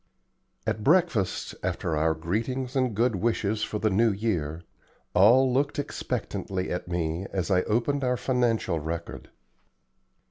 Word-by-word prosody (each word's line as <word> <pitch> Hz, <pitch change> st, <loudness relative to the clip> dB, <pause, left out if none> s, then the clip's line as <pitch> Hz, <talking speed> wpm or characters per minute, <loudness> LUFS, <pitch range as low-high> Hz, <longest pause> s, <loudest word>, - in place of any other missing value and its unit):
At 110 Hz, -, -2 dB
breakfast, 150 Hz, -, +2 dB
after 90 Hz, -2 st, -2 dB
our 80 Hz, +1 st, +2 dB
greetings 115 Hz, -, -2 dB
and 130 Hz, -5 st, +1 dB
good 115 Hz, -1 st, +2 dB
wishes 110 Hz, 0 st, 0 dB
for 105 Hz, -, -2 dB
the 110 Hz, 0 st, +1 dB
New 110 Hz, +4 st, +3 dB
Year, 85 Hz, -7 st, -2 dB, 0.5 s
all 125 Hz, +6 st, +6 dB
looked 140 Hz, +2 st, +1 dB
expectantly 95 Hz, -8 st, -3 dB
at 90 Hz, -, -3 dB
me 85 Hz, +1 st, -2 dB
as 95 Hz, 0 st, -2 dB
I 90 Hz, -1 st, +4 dB
opened 135 Hz, +6 st, 0 dB
our 125 Hz, -1 st, +1 dB
financial 115 Hz, -8 st, 0 dB
record. 85 Hz, +2 st, -6 dB
105 Hz, 135 wpm, -27 LUFS, 90-125 Hz, 0.5 s, all